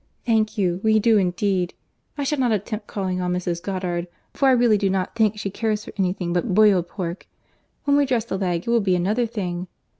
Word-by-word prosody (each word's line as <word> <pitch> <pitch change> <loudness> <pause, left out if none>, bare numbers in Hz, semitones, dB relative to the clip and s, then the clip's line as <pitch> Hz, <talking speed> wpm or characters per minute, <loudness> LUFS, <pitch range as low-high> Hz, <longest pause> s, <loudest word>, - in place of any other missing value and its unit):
Thank 220 -1 +1
you, 180 -3 +1
we 220 0 +4
do 220 0 +4
indeed. 180 -1 0 0.4
I 285 - -1
shall 285 +1 -1
not 250 -3 +2
attempt 210 +1 -3
calling 185 -2 -2
on 180 0 -1
Mrs. 175 -1 -2
Goddard, 180 -2 -3 0.3
for 275 - +2
I - - +6
really 240 -4 +4
do 195 - +1
not 190 -1 -1
think 220 -2 +2
she 200 -1 -4
cares 215 0 -2
for - - -10
any 190 -2 +1
thing 180 -2 -3
but 180 +2 0
boiled 200 -5 +5
pork: 175 -1 -5 0.6
when 285 0 +3
we 285 -1 +3
dress 240 -4 0
the 230 - -3
leg 175 -3 -1
it 235 - -1
will 235 -1 +4
be 190 -2 +2
another 210 +7 +1
thing. 180 -5 -4
200 Hz, 220 wpm, -23 LUFS, 180-220 Hz, 0.6 s, I